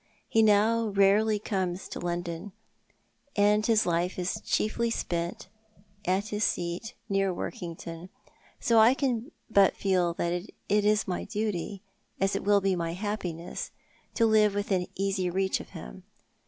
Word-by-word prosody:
He 225 - +3
now 220 +2 +4
rarely 205 +2 +3
comes 190 -3 -2
to - - -6
London, 175 +2 -4 0.8
and 210 0 +4
his 220 -1 +3
life 175 +1 0
is 180 0 -2
chiefly 215 +2 0
spent 170 -6 -3 0.6
at 190 +4 0
his 210 0 -1
seat 175 +5 -2
near 195 -2 +1
Workington, 170 0 -6 0.5
so 230 -1 +4
I 230 +4 +7
can 250 -4 -1 0.2
but 200 -4 +4
feel 180 -3 +1
that 170 0 -1 0.3
it 205 0 +2
is 210 0 +3
my 180 - -2
duty, 205 -2 -3 0.4
as 195 +1 +1
it - - -2
will 205 0 +4
be 195 -1 +2
my 165 -1 -2
happiness, 180 -4 -4 0.5
to 230 - +4
live 215 -2 +4
within 195 -3 0
easy 190 -1 0
reach 190 +2 0
of - - -10
him. - - -9
195 Hz, 145 wpm, -28 LUFS, 180-215 Hz, 0.8 s, I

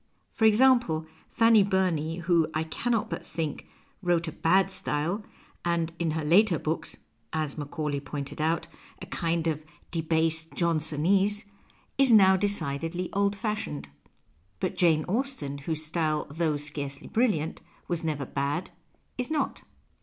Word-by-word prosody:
For 220 - +1
example, 220 -8 +4 0.2
Fanny 225 -2 +5
Burney, 180 -5 +1
who, 170 -2 +2
I 155 - +1
cannot 225 +7 -1
but - - -4
think, 155 -2 -4 0.3
wrote 175 -2 +1
a - - -3
bad 185 +4 +2
style, 170 +5 -2 0.4
and 170 -1 0
in 170 -1 0
her 155 0 -2
later 180 +3 +5
books 155 +2 -3 0.4
(as 155 -3 -2
Macaulay 150 -1 -3
pointed 140 +1 -6
out) 165 +1 0 0.3
a - - -7
kind 170 -1 -1
of 155 -2 -1 0.3
debased 160 -1 +1
4 - - -25
PASTICHE - - -8 0.4
Johnsonese, 200 +5 +2 0.5
is 270 -2 +5
now 190 -4 +7
decidedly 175 -3 -1
old 200 0 +1
fashioned. 200 - -4 0.7
But - - -2
Jane 160 -3 +3
Austen, 215 - -2
whose 155 +2 -1
style, 155 -1 0
though 155 -1 0
scarcely 145 -1 -5
brilliant, 210 -10 0 0.3
was 170 -1 -1
never 150 -4 -2
bad, 140 +6 -2 0.5
is 250 - 0
not. 315 -1 -1
165 Hz, 140 wpm, -27 LUFS, 155-195 Hz, 0.7 s, now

